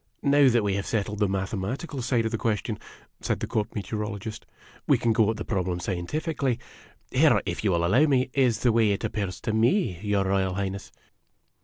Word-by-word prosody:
" -, -, -45 dB
Now 145 Hz, -2 st, +6 dB
that 120 Hz, -2 st, +2 dB
we 100 Hz, -1 st, 0 dB
have 100 Hz, -, -3 dB
settled 105 Hz, -1 st, -2 dB
the 105 Hz, -, +3 dB
mathematical 100 Hz, -, -3 dB
side 120 Hz, -2 st, +1 dB
of 110 Hz, -, -1 dB
the 115 Hz, -, -1 dB
ques 110 Hz, -4 st, 0 dB
tion," 110 Hz, -3 st, -4 dB, 0.4 s
said -, -, -1 dB
the -, -, -2 dB
Court 110 Hz, 0 st, -2 dB
Meteorologist, 105 Hz, 0 st, -5 dB, 0.4 s
"we -, -, +5 dB
can 115 Hz, -1 st, +1 dB
go 110 Hz, -1 st, +3 dB
at 110 Hz, -, -1 dB
the 110 Hz, -, -5 dB
problem 90 Hz, -3 st, -1 dB
scientifically. 130 Hz, -, -2 dB, 0.5 s
Here, -, -, +5 dB
if -, -, -3 dB
you 105 Hz, -, +2 dB
will 85 Hz, -1 st, +1 dB
allow 125 Hz, -, +4 dB
me, 130 Hz, -2 st, +2 dB
is 125 Hz, -5 st, +2 dB
the 120 Hz, -, +4 dB
way 110 Hz, -3 st, +3 dB
it 100 Hz, -, -4 dB
appears 100 Hz, -4 st, -3 dB
to 110 Hz, -, -2 dB
me, 115 Hz, -, +2 dB
your 105 Hz, -2 st, +1 dB
Royal 95 Hz, -1 st, +1 dB
Highness." 100 Hz, 0 st, -4 dB
110 Hz, 205 wpm, -26 LUFS, 100-120 Hz, 0.5 s, Now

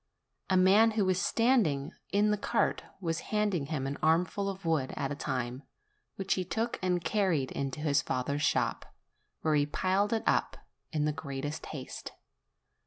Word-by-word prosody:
A 190 Hz, -, +4 dB
man 200 Hz, +5 st, +6 dB
who 205 Hz, -, +3 dB
was 185 Hz, -1 st, +1 dB
standing 185 Hz, -, +2 dB, 0.2 s
in 205 Hz, +1 st, +3 dB
the -, -, +3 dB
cart 205 Hz, -, 0 dB, 0.2 s
was 165 Hz, -3 st, -2 dB
handing 205 Hz, -9 st, 0 dB
him 145 Hz, -4 st, -2 dB
an 140 Hz, +1 st, -4 dB
armful 180 Hz, +5 st, +2 dB
of 190 Hz, -2 st, -7 dB
wood 155 Hz, -5 st, 0 dB
at 140 Hz, -1 st, -2 dB
a -, -, -2 dB
time, 125 Hz, -1 st, -3 dB, 0.5 s
which 195 Hz, -1 st, 0 dB
he 185 Hz, -, -1 dB
took 225 Hz, +6 st, -2 dB
and 180 Hz, -2 st, 0 dB
carried 180 Hz, -11 st, +1 dB
into 140 Hz, +2 st, -3 dB
his 145 Hz, -1 st, +2 dB
father's 140 Hz, +2 st, -2 dB
shop, -, -, 0 dB, 0.5 s
where 155 Hz, -, +1 dB
he 145 Hz, -1 st, +3 dB
piled 190 Hz, +6 st, +1 dB
it 225 Hz, -1 st, 0 dB
up -, -, +1 dB, 0.3 s
in 150 Hz, -2 st, 0 dB
the 150 Hz, -, +1 dB
greatest 145 Hz, +1 st, -5 dB
haste. 135 Hz, -4 st, -7 dB
165 Hz, 170 wpm, -30 LUFS, 145-195 Hz, 0.5 s, man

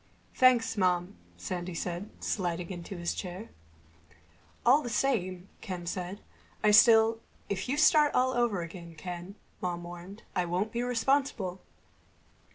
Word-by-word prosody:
"Thanks, 250 Hz, -3 st, +4 dB
Mom," 180 Hz, 0 st, +1 dB, 0.2 s
Sandy 180 Hz, -1 st, -4 dB
said, 175 Hz, +4 st, -4 dB
sliding 175 Hz, -2 st, -2 dB
into 175 Hz, +1 st, -7 dB
his 170 Hz, 0 st, -2 dB
chair. 185 Hz, +4 st, -6 dB, 1.2 s
"All 265 Hz, +5 st, +6 dB
the 240 Hz, -, -5 dB
same," 185 Hz, -8 st, 0 dB
Ken 180 Hz, -4 st, -5 dB
said, 180 Hz, +3 st, -4 dB, 0.4 s
"I 210 Hz, -, +5 dB
still—" 225 Hz, +1 st, +6 dB, 0.3 s
"If 195 Hz, +3 st, -3 dB
you 280 Hz, -, 0 dB
start 300 Hz, -1 st, +5 dB
all 255 Hz, +1 st, +3 dB
over 235 Hz, -8 st, +1 dB
again, 170 Hz, -1 st, -9 dB
Ken," 180 Hz, +3 st, -7 dB, 0.3 s
Mom 175 Hz, -1 st, -3 dB
warned, 175 Hz, +4 st, -10 dB
"I 180 Hz, -, +1 dB
won't 185 Hz, +5 st, -1 dB
be 235 Hz, -, -2 dB
responsible." 245 Hz, -6 st, 0 dB
190 Hz, 135 wpm, -30 LUFS, 175-230 Hz, 1.2 s, All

